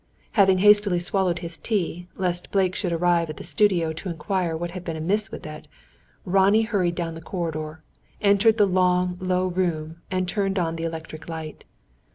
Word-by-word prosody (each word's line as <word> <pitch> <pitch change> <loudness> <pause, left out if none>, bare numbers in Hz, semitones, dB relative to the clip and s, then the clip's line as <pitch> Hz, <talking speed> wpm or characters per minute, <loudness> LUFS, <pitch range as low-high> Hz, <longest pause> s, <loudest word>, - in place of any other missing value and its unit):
Having 190 -3 +4
hastily 205 -2 +5
swallowed 185 -1 0
his 165 -2 -5
tea, 180 -4 -2
lest 180 -2 -2
Blake 190 -2 +1
should 180 - -2
arrive 170 -1 +2
at 155 - -6
the - - -8
studio 180 -7 +2
to 185 +4 -6
inquire 170 0 -2
what 170 +1 -4
had 180 0 -7
been 165 -2 -4
amiss 195 +7 0
with - - -9
it, 155 0 -9 0.6
Ronnie 195 +4 +4
hurried 190 -6 0
down 165 -1 -3
the 165 - -9
corridor, 160 -3 -5 0.4
entered 210 +2 +4
the 210 - +5
long, 180 -1 +2
low 185 0 +1
room, 170 -3 -2
and 185 -1 -1
turned 195 +1 -1
on 165 -2 0
the 165 0 -4
electric 160 0 -7
light. 160 -2 -7
180 Hz, 180 wpm, -24 LUFS, 165-195 Hz, 0.6 s, hastily